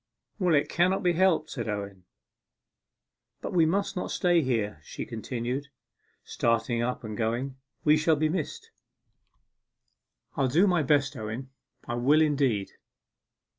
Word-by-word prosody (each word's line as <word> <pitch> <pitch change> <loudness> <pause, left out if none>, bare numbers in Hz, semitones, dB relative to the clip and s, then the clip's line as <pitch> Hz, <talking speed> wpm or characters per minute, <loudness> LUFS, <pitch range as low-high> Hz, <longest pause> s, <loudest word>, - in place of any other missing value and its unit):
'Well, 180 -4 +3
it 145 - +2
cannot 185 +4 +1
be 175 -1 +3
helped,' 170 -3 +2
said 120 -4 -4
Owen. 100 -3 -5 1.3
'But - - -5
we 165 -3 +4
must 195 +4 0
not 180 - -3
stay 175 -2 +2
here,' 110 - -1
she - - -6
continued, 125 +4 -4 0.6
starting 115 0 0
up 125 +1 -2
and 110 -1 -5
going. 120 +5 -2 0.3
'We 150 0 +5
shall 155 +1 +3
be 155 +1 +1
missed. 160 -1 -4 1.6
I'll 135 - +2
do 160 +10 +4
my 180 -4 +3
best, 145 -1 +2
Owen 115 +4 -6 0.4
I 120 - -2
will, 140 +6 +4
indeed. 135 -10 +1
135 Hz, 135 wpm, -28 LUFS, 115-160 Hz, 1.6 s, We